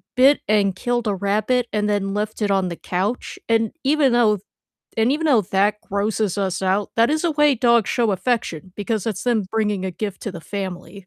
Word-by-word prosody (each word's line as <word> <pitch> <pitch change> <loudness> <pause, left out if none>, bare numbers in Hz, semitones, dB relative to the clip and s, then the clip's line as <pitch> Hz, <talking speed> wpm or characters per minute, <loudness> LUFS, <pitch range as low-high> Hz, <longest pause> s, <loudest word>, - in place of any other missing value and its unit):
bit 270 +3 +5
and 200 -3 +2
killed 240 +3 -1
a 205 - +1
rabbit 215 +6 0
and 210 -1 0
then 195 -1 0
left 210 +1 -3
it 205 - +1
on 190 -2 +1
the 170 - -5
couch, 195 +7 -3
and 225 -1 +2
even 280 -1 +3
though 215 -4 +3 0.6
and 225 +2 +3
even 310 +3 -1
though 265 -7 +5
that 200 +3 +1
grosses 205 0 -1
us 190 -2 -1
out, 190 +2 0
that 230 +1 +4
is 310 +2 0
a 340 - +3
way 295 -1 +4
dogs 235 -2 +3
show 235 -3 +1
affection 190 -4 -2
because 215 0 -2
it's 215 -2 -2
them 235 -4 +1
bringing 210 -3 0
a - - -2
gift 200 +2 -5
to 210 - -4
the 170 - -8
family. 190 -1 -6
210 Hz, 205 wpm, -21 LUFS, 195-235 Hz, 0.6 s, bit